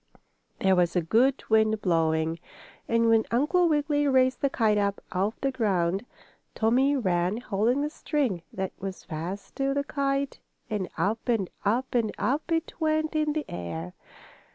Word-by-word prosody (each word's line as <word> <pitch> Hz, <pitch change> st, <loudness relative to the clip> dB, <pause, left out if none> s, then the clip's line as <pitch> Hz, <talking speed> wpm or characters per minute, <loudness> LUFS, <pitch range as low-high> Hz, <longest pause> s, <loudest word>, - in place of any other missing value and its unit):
There 190 Hz, -1 st, +3 dB
was 175 Hz, -1 st, +2 dB
a 180 Hz, -, +3 dB
good 250 Hz, +10 st, +2 dB
wind 220 Hz, 0 st, +3 dB
blowing, 160 Hz, -2 st, +1 dB, 0.5 s
and 230 Hz, 0 st, +2 dB
when 225 Hz, -1 st, +5 dB
Uncle 320 Hz, +8 st, +3 dB
Wiggily 290 Hz, -1 st, +1 dB
raised 260 Hz, -1 st, +3 dB
the 280 Hz, -, +2 dB
kite 215 Hz, -5 st, +2 dB
up 200 Hz, 0 st, 0 dB
off 200 Hz, +3 st, -1 dB
the 275 Hz, -, +1 dB
ground, 195 Hz, -4 st, 0 dB, 0.5 s
Tommie 255 Hz, +6 st, +3 dB
ran, 185 Hz, -3 st, 0 dB
holding 235 Hz, +3 st, 0 dB
the 295 Hz, -, -1 dB
string 275 Hz, -, -1 dB
that 190 Hz, -1 st, -3 dB
was 190 Hz, -1 st, -6 dB
fast 180 Hz, +5 st, -6 dB
to 275 Hz, 0 st, 0 dB
the 280 Hz, -, +1 dB
kite 275 Hz, -1 st, -1 dB, 0.3 s
and 200 Hz, -4 st, -2 dB
up 220 Hz, +5 st, -1 dB
and 215 Hz, -6 st, +1 dB
up 240 Hz, +6 st, 0 dB
and 230 Hz, -3 st, +1 dB
up 295 Hz, +5 st, -1 dB
it 325 Hz, 0 st, 0 dB
went 310 Hz, 0 st, +1 dB
in 305 Hz, -1 st, +1 dB
the 310 Hz, 0 st, -2 dB
air. 85 Hz, 0 st, -6 dB
225 Hz, 160 wpm, -27 LUFS, 190-275 Hz, 0.5 s, when